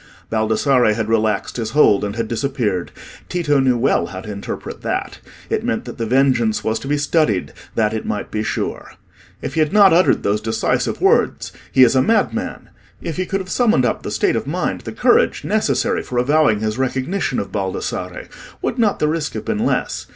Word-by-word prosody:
Baldassarre 110 +1 +2
had 110 -1 -2
relaxed 110 -1 0
his 115 -2 -2
hold, 105 -10 +5
and 105 0 -3
had 115 -1 -2
disappeared. 115 -7 -2 0.4
Tito 150 -5 +1
knew 130 -2 +3
well 130 +4 +1
how 95 -1 -7
to 105 - -7
interpret 100 -1 -6
that: - - -3 0.3
it - - -1
meant - - -2
that - - -9
the 115 - -1
vengeance 125 -3 +2
was 110 0 -1
to - - -8
be 145 +1 +1
studied 145 - +1 0.2
that 110 -1 +1
it 110 - -3
might 105 - -4
be 105 - -1
sure. 110 0 -4 0.5
If - - -4
he 160 - -1
had 155 -1 +2
not 200 -4 +6
uttered 180 +2 +3
those 105 +1 0
decisive 110 0 -1
words—"He 130 - +2
is 125 +1 +4
a 130 - +5
madman"—if 210 - -2
he 185 -1 -2
could 195 0 -1
have 185 - -9
summoned 220 - +3
up - - -1
the - - -5
state - - +1
of - - -2
mind, - - -2
the - - -7
courage, - - +2
necessary - - 0
for 125 - -6
avowing 130 -4 +3
his 110 +2 -2
recognition 130 +4 -1
of 100 - -3
Baldassarre, 95 -2 -4 0.3
would 245 - -3
not 215 -3 +2
the 150 - +1
risk 155 -1 -2
have - - -5
been 215 - -1
less? - - -1
125 Hz, 195 wpm, -19 LUFS, 110-150 Hz, 0.5 s, not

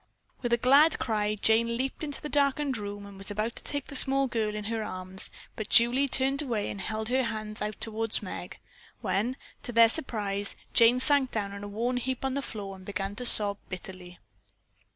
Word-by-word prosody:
With 240 -2 -2
a 235 - +4
glad 280 +6 +5
cry 210 -2 -1
Jane 230 +2 +2
leaped 265 +4 -3
into 290 -2 -4
the 300 - -5
darkened 285 -1 +1
room 205 -2 -5
and 200 -1 -12
was 195 - -5
about 215 +3 -2
to - - -5
take 285 -2 -2
the 285 - -8
small 270 +1 +3
girl 220 -4 -1
in 210 - -4
her 225 +1 -2
arms, 185 -2 -2 0.3
but 215 -1 -5
Julie 245 +4 +5
turned 270 +2 +2
away 230 -8 -2
and 195 - -7
held 220 +1 -3
her 260 +1 +2
hands 215 -3 -4
out 210 0 -4
toward 225 0 -1
Meg, - - -7 0.4
when 240 +7 -1 0.2
to - - -5
their 230 -1 +6
surprise 205 -7 -2 0.2
Jane 235 +1 +5
sank 280 -1 +3
down 200 -4 -3
in 200 0 -8
a - - -5
worn 235 +5 -2
out - - -2
heap 260 0 -3
on 265 - -1
the 280 - -1
floor 200 -6 -7
and 190 - -14
began 195 +1 -4
to 250 0 +2
sob 205 -3 +6
bitterly. 185 -1 -8
225 Hz, 210 wpm, -28 LUFS, 205-260 Hz, 0.4 s, their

